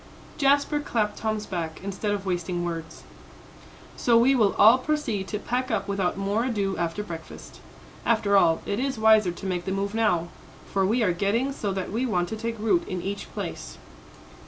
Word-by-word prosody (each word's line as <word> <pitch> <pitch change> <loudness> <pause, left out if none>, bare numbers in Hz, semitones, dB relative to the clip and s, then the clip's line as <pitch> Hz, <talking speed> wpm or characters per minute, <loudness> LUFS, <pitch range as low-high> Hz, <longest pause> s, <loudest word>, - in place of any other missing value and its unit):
Jasper 285 +1 +3
clapped 215 -7 -1
Tom's 215 -1 -2
back, 165 -4 -4
instead 200 +2 -3
of 200 -1 -2
wasting 175 -1 -2
words. 165 -1 -6 0.9
"So 235 -1 +3
we 245 +4 +5
will 220 -6 +3
all 225 +5 +7
proceed 255 -10 -2
to 210 - -3
pack 250 +4 -2
up 215 -4 -1
without 195 -2 -1
more 200 +4 0
ado 200 -6 -1
after 170 +4 -2
breakfast. 165 -5 -9 0.4
After 215 -3 +2
all, 165 -4 +4
it 200 +2 -2
is 265 -1 -1
wiser 220 -3 +5
to 175 - -9
make 180 -2 -2
the 190 - -2
move 200 +1 -2
now, 195 -7 +1 0.4
for 195 -1 0
we 230 +4 +2
are 180 -4 +2
getting 210 +9 0
so 205 -7 -3
that 190 -1 -4
we 240 +5 -1
want 180 -5 0
to 220 - -3
take 230 +1 -4
root 335 - +1
in 185 - -3
each 200 +1 -5
place." - - -6
205 Hz, 185 wpm, -26 LUFS, 190-230 Hz, 0.9 s, all